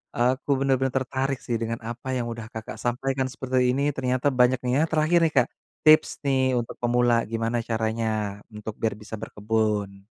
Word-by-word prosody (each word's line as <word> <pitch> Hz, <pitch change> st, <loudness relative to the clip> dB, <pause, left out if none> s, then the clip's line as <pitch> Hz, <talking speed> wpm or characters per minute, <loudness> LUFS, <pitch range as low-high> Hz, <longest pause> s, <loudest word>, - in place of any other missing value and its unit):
Aku 130 Hz, +4 st, +1 dB
benar-benar 135 Hz, -1 st, +1 dB
tertarik 135 Hz, +1 st, -1 dB
sih 120 Hz, -, 0 dB
dengan 115 Hz, +1 st, -2 dB
apa 120 Hz, +2 st, -7 dB
yang 120 Hz, -2 st, -1 dB
udah 115 Hz, -1 st, -6 dB
Kakak 110 Hz, 0 st, -7 dB
sampaikan 130 Hz, +2 st, -1 dB
seperti 130 Hz, -1 st, 0 dB
ini 140 Hz, -, 0 dB
ternyata 130 Hz, +1 st, 0 dB
banyak 125 Hz, +1 st, +5 dB
nih 125 Hz, 0 st, 0 dB
ya. -, -, +4 dB
Terakhir 160 Hz, +2 st, +3 dB
nih, 155 Hz, -, -6 dB
Kak, 125 Hz, -, +5 dB, 0.4 s
tips 155 Hz, 0 st, +7 dB
nih 135 Hz, -2 st, +2 dB, 0.2 s
untuk 120 Hz, -, -5 dB
pemula 120 Hz, 0 st, +3 dB, 0.2 s
gimana 115 Hz, +1 st, -1 dB
caranya, 110 Hz, 0 st, 0 dB, 0.5 s
untuk 105 Hz, +1 st, -6 dB
biar 110 Hz, -2 st, 0 dB
bisa 105 Hz, +1 st, -7 dB
berkebun? 105 Hz, -2 st, -1 dB
125 Hz, 170 wpm, -25 LUFS, 115-130 Hz, 0.5 s, tips